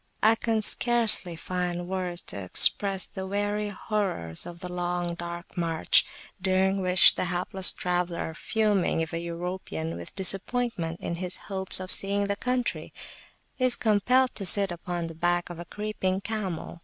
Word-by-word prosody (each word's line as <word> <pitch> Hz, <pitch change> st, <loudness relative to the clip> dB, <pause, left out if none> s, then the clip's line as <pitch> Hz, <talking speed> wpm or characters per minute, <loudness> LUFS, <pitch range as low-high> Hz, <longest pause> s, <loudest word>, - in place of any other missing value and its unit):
I 220 Hz, +1 st, +6 dB
can 225 Hz, -1 st, -1 dB
scarcely 225 Hz, -7 st, +5 dB
find 175 Hz, +1 st, -4 dB
words 180 Hz, -2 st, -3 dB
to 100 Hz, -, -6 dB
express 190 Hz, -, +4 dB
the 190 Hz, -2 st, -8 dB
weary 205 Hz, +1 st, -2 dB
horrors 190 Hz, -, -2 dB
of 170 Hz, 0 st, -10 dB
the 180 Hz, -1 st, -7 dB
long 175 Hz, -1 st, -3 dB
dark 170 Hz, 0 st, -8 dB
march, 165 Hz, -2 st, +1 dB, 0.3 s
during 190 Hz, +1 st, +1 dB
which 185 Hz, 0 st, +6 dB
the -, -, -3 dB
hapless 180 Hz, +2 st, +2 dB
traveller, 175 Hz, -2 st, -3 dB
fuming, 205 Hz, -1 st, 0 dB
if 160 Hz, +1 st, -4 dB
a 165 Hz, -, -2 dB
European, 170 Hz, -, -5 dB
with 85 Hz, 0 st, -10 dB
disappointment 195 Hz, -2 st, 0 dB
in 170 Hz, -, -4 dB
his 180 Hz, 0 st, -5 dB
hopes 190 Hz, -2 st, -1 dB
of 185 Hz, 0 st, -6 dB
seeing 200 Hz, +1 st, +2 dB
the 200 Hz, 0 st, -2 dB
country, 250 Hz, +2 st, -3 dB, 0.7 s
[p.68] 255 Hz, -, +2 dB
is 245 Hz, -, +2 dB
compelled 245 Hz, +4 st, +1 dB
to 200 Hz, -, -3 dB
sit 200 Hz, 0 st, +6 dB
upon 175 Hz, 0 st, -5 dB
the 165 Hz, -, -8 dB
back 175 Hz, +2 st, -1 dB
of 170 Hz, -, -9 dB
a 175 Hz, -, -7 dB
creeping 195 Hz, -1 st, -3 dB
camel. 195 Hz, -6 st, -5 dB
185 Hz, 160 wpm, -26 LUFS, 175-205 Hz, 0.7 s, I